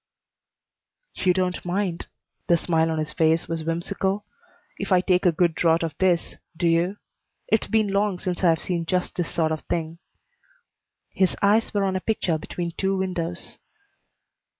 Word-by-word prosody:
"You 185 - +2
don't 180 0 -1
mind," 180 -1 -2 0.4
the 170 - +5
smile 165 -1 +1
on 160 - -1
his 155 -1 -3
face 160 +1 +2
was 165 -1 -3
whimsical, 190 +5 -2 0.5
"if 195 - -4
I 185 - +6
take 180 0 +2
a - - +5
good 170 0 +2
draught 165 0 +2
of 165 -2 -3
this, 180 -3 +1 0.2
do 170 - +1
you? 170 +4 +2 0.5
It's 220 - +2
been 220 -2 +2
long 200 -1 +1
since 180 0 -3
I've 165 -2 +5
seen 170 -2 -2
just 180 +1 0
this 175 - -3
sort 160 -2 +1
of 155 - -2
thing." 165 0 -3 1.1
His 190 -2 +1
eyes 210 +3 +3
were 205 -1 0
on 190 -1 0
a 185 - -1
picture 180 -7 0
between 170 +2 -4
two 195 +3 -1
windows. 180 -2 -2
180 Hz, 165 wpm, -24 LUFS, 165-190 Hz, 1.1 s, I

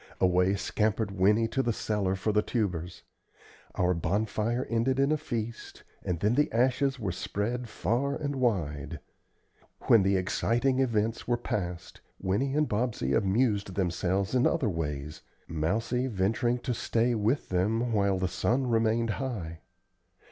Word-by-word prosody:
Away 90 +1 +3
scampered 105 +1 0
Winnie 105 +4 +3
to 135 - 0
the 120 - 0
cellar 105 -3 -1
for 95 +3 -1
the 105 0 +3
tubers. 90 -7 -3 0.7
Our 90 0 +2
bonfire 105 +7 -1
ended 120 +3 +1
in 140 +2 +3
a - - +4
feast, 115 -6 -5 0.2
and 90 -2 -2
then 105 +3 +3
the 150 +3 +2
ashes 130 +3 +1
were 100 -5 -2
spread 115 +7 -3
far 120 +9 -1
and 145 -2 -3
wide. 85 - -1 0.8
When 115 - +5
the 95 +1 +2
exciting 120 +7 +1
events 115 -3 0
were 120 0 +2
past, 90 -7 -4 0.2
Winnie 105 +9 0
and 150 0 +2
Bobsey 105 - -1
amused 100 -1 +1
themselves 95 +2 0
in 125 0 +4
other 145 -10 +1
ways, 75 -3 -4 0.3
Mousie 110 +11 -1
venturing 115 +3 0
to 125 - -2
stay 115 +1 +1
with 115 +5 0
them 110 +6 0
while 100 -2 +2
the 95 0 0
sun 125 +8 0
remained 115 -1 +1
high. 90 - -4
110 Hz, 145 wpm, -29 LUFS, 95-120 Hz, 0.8 s, When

